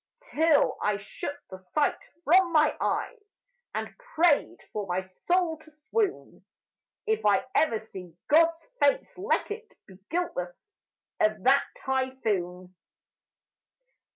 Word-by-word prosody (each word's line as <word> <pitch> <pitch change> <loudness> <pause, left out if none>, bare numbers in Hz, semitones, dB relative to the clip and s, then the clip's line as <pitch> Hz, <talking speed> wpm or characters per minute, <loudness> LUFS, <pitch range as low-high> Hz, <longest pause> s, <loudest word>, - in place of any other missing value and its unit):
Till 315 -1 +3
I 210 -1 +1
shut 205 +8 -6
the 190 - -8
sight 285 +11 -1
from 350 +3 +5
my 310 -1 +4
eyes 425 -3 -3 0.4
And - - -4 0.2
prayed 325 -3 +3 0.2
for 205 -2 -3
my 180 +1 0
soul 320 - -1
to 310 - -17
swoon: 365 +7 -3 0.6
If 440 0 +1 0.3
ever 310 -7 +3
I - - +1
see 185 -6 -10
God's 330 +2 +4 0.2
face, - - +2
let 415 +2 0
it 440 +1 -7
Be 190 -2 -16
guiltless 335 - -4 0.5
of 215 -2 +1
that 270 +2 +5
typhoon! 210 -9 -2
295 Hz, 120 wpm, -27 LUFS, -, 0.6 s, from